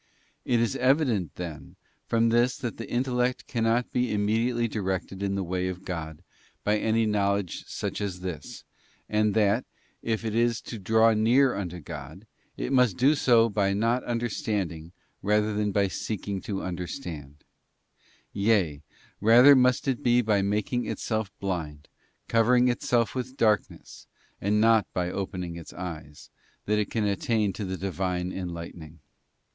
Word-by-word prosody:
It 120 -2 +2
is 115 -4 0
evident, 130 - +1
then, 85 -4 -7 0.3
from 115 0 +2
this 120 +2 +2
that 120 -2 -5
the 115 - -7
intellect 125 +1 0
cannot 115 +1 0
be 125 0 0
immediately 115 +3 +1
directed 95 -2 -3
in 100 0 -1
the 100 - -1
way 90 +1 -2
of 95 0 -6
God 80 -4 -5 0.4
by 105 +1 +2
any 110 +1 +2
know 100 -2 +2
ledge 100 -4 -5
such - - -4
as 95 -3 -4
this, 90 -4 -6 0.4
and 105 0 +1
that, 110 +2 +3 0.4
if 115 0 -2
it 110 - -2
is 115 0 +2
to 115 - -7
draw 110 +3 +4
near 125 +5 +4
unto 90 -3 -4
God, 80 +4 -9 0.2
~ - - -40
it - - -3
must 125 -8 +3
do 140 +4 +5
so 120 -6 +4
by 100 -2 +1
not 115 +5 +1
understanding 105 -8 -2 0.3
rather 105 +1 +1
than 105 0 0
by 100 0 +2
seeking 100 0 -4
to 100 -2 -4
understand; 85 - -6 0.9
yea, 100 -8 +1 0.4
rather 120 +6 +7
it - - +9
must 125 0 +2
be 120 0 +3
by 105 -2 +2
making 105 +5 -1
itself 110 -3 -2
blind, 80 -7 -4 0.4
covering 125 +2 +4
itself 120 -4 +1
with 130 +1 -5
darkness, 105 -3 -1 0.3
and 105 +2 +2
not 110 -1 +4
by 90 -1 -1
opening 90 -3 -4
its 85 - -10
eyes, 80 -5 -8 0.3
that 105 +1 +1
it 105 - -1
can 110 - -1
attain 105 - 0
to 105 - -5
the 95 0 -4
Divine 90 -1 -2
enlightening. 85 -3 -7
105 Hz, 155 wpm, -27 LUFS, 95-115 Hz, 0.9 s, it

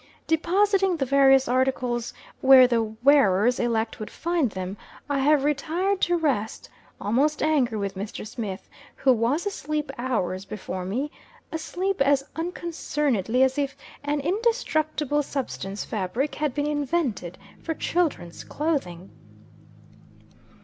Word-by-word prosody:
Depositing 380 +3 +2
the 270 - 0
various 270 0 +5
articles 250 -1 0 0.3
where 260 -1 +8
the 240 -2 +2
wearers 225 -1 +3
elect 225 -2 -1
would 215 - -6
find 335 -6 0
them, 190 -1 -5 0.3
I 285 -1 0
have 290 +1 +3
retired 330 +7 0
to 350 0 +2
rest; 260 -10 -1 0.3
almost 275 +9 +1
angry 265 -8 +2
with 200 -2 -2
Mr. 200 +3 -6
Smith, 210 -2 -6 0.3
who 265 - +4
was 245 - 0
asleep 305 -7 -3
hours 190 -7 -1
before 185 -2 -6
me 260 +10 -2 0.4
asleep 355 +2 -2
as 275 0 +4
unconcernedly 295 - -1
as 265 +2 +1
if 275 -1 -2 0.3
an 290 0 -1
indestructible 310 - 0
substance 240 -8 -4
fabric 225 +8 -2
had 295 -4 -2
been 290 0 0
invented 290 - -1 0.2
for 325 - -3
children's 310 - -1
clothing. 195 - -3
275 Hz, 120 wpm, -25 LUFS, 225-310 Hz, 0.4 s, where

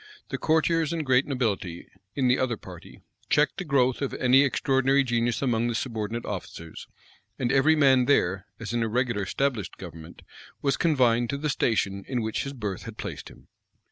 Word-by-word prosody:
The - - -4
courtiers 160 0 +2
and 165 -2 -2
great 130 0 +3
nobility, 105 -10 -2 0.3
in 135 -3 +1
the 125 - +3
other 120 -3 0
party, - - -13 0.3
checked 150 0 +2
the - - -2
growth 130 -5 +1
of 140 - -2
any 130 +2 +5
extraordinary 135 +1 +2
genius 120 -1 0
among 120 -3 +1
the 120 - -2
subordinate 115 -1 -3
officers; 85 -4 -7 0.5
and 125 -2 -1
every 140 +4 +4
man 135 -4 +4
there, 95 -8 +1
as 115 0 -5
in 120 - 0
a 115 - +1
regular 120 -1 0
established 115 0 -2
government, 80 -2 -11 0.4
was 140 -2 +1
confined 120 -7 +2
to 140 - -2
the 150 +1 -2
station 100 -7 0
in 125 -3 -2
which 110 +4 -2
his 140 - -5
birth 105 -7 -4
had 115 -2 -9
placed - - -6
him. - - -18
125 Hz, 180 wpm, -26 LUFS, 110-140 Hz, 0.5 s, any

